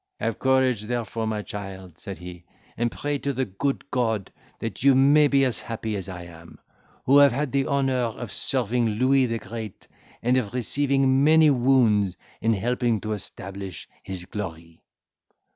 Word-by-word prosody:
"Have 115 -1 -2
courage, 130 -4 +2
therefore, 115 -1 -3
my 105 -1 -2
child," 95 -4 -8
said 100 - -7
he, 90 -1 -10 0.3
"and 120 0 0
pray 145 -1 -2
to 140 0 -2
the 130 +1 -1
good 125 +8 -2
God, 110 -6 -1 0.3
that 115 -4 -5
you 135 0 +5
may 145 +3 +6
be 140 -1 +3
as 125 - 0
happy 110 -1 -4
as 95 -1 -4
I 90 -2 -7
am, 85 -1 -13 0.5
who 140 +2 +6
have 140 -1 +7
had 140 +2 -2
the 135 -1 +1
honour 140 -2 +1
of 115 -2 -6
serving 120 +1 0
Louis 130 +4 +3
the 115 0 -2
Great, 110 -1 -8 0.4
and 125 +2 +3
of 125 -2 -2
receiving 135 +2 +2
many 155 0 +6
wounds, 120 -8 +3 0.2
in 115 0 +2
helping 120 +2 0
to 110 0 -3
establish 100 -3 -7
his 95 -2 -7
glory." 85 -5 -7
115 Hz, 165 wpm, -25 LUFS, 100-135 Hz, 0.5 s, have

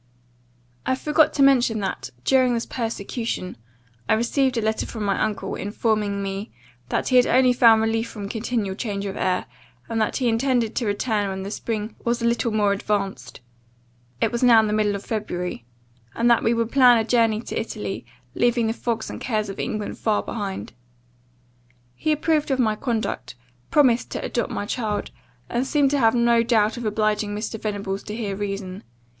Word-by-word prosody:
"I 260 - +1
forgot 300 +3 +3
to 280 - +4
mention 250 -5 +4
that, 195 - -3
during 255 -2 +3
this 230 - -2
persecution, 225 -4 -4 0.5
I - - +5
received 255 +3 +1
a - - +1
letter 220 0 -1
from 220 -3 -5
my 200 -1 0
uncle, 210 -3 -2
informing 205 -1 -1
me, 195 +2 -4 0.4
'that - - -1
he 250 -1 +5
only 255 0 +4
found 230 -2 +6
relief 225 +1 0
from 205 -2 -6
continual 220 -2 -2
change 200 -2 -3
of 195 - -4
air; 185 - 0 0.4
and 225 -1 -1
that 215 - 0
he 255 - 0
intended 235 -1 +1
to 240 - -1
return 205 0 0
when 190 0 -4
the 200 - -5
spring 215 -1 -3
was 235 0 0
a 235 - -2
little 235 0 +1
more 205 -2 +2
advanced 195 - -3 0.8
(it - - +1
was 235 - -2
now 240 -3 +7
the 210 -1 -1
middle 210 -1 +1
of 200 - -7
February), 180 - -4 0.5
and 235 +1 +3
then 235 - +4
we 225 - +3
would 230 0 -1
plan 250 -3 +6
a 225 - +2
journey 225 -2 +2
to - - -4
Italy, 215 -3 -5 0.3
leaving 240 -1 +2
the 225 - 0
fogs 230 -1 -3
and - - -7
cares 215 -4 -1
of 195 - -7
England 215 -1 -3
far 215 -2 +1
behind.' 200 - -5 1.2
He 310 - -1
approved 305 0 +1
of 265 - +1
my 220 -4 +2
conduct, 220 - -3 0.3
promised 255 -5 +3
to - - -3
adopt 235 - -1
my 205 - -3
child, 215 -1 -2 0.4
and 245 +2 -1
seemed 280 -1 +2
to 285 - +2
have 225 -1 +4
no 235 -1 +4
doubt 225 -2 +2
of 240 -2 -6
obliging 210 -1 0
Mr. 215 +1 -4
Venables 200 -2 -3
to 210 - -5
hear 210 -4 -3
reason. 195 -1 -5
225 Hz, 185 wpm, -23 LUFS, 205-240 Hz, 1.2 s, now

